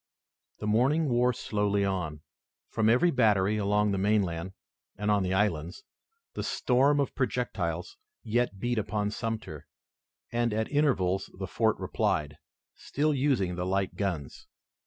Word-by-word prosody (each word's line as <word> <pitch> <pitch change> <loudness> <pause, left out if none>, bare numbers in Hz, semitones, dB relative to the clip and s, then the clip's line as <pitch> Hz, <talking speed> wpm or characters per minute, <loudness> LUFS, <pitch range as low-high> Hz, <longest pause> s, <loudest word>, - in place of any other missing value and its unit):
The - - -6
morning 135 +9 +2
wore 125 +1 +3
slowly 105 -3 0
on. 85 -6 -3 0.5
From 110 -1 +2
every 150 +10 +4
battery 105 -5 +3
along 105 0 +2
the 100 - 0
mainland 95 -3 0 0.4
and 105 0 0
on 105 -1 +3
the 95 0 0
islands, 90 -3 -1 0.5
the - - -4
storm 135 +3 +2
of 140 - 0
projectiles 100 - -2 0.3
yet 120 -2 0
beat 120 +1 0
upon 105 0 -2
Sumter, 110 -10 -5 0.6
and, 120 -2 0
at 110 0 -1
intervals, 110 -11 +1
the - - -4
fort - - +1
replied, 75 0 -1 0.3
still 150 +2 -1
using 130 -10 +1
the 90 0 -3
light 95 0 -1
guns. 85 -9 -4
105 Hz, 135 wpm, -28 LUFS, 95-120 Hz, 0.6 s, every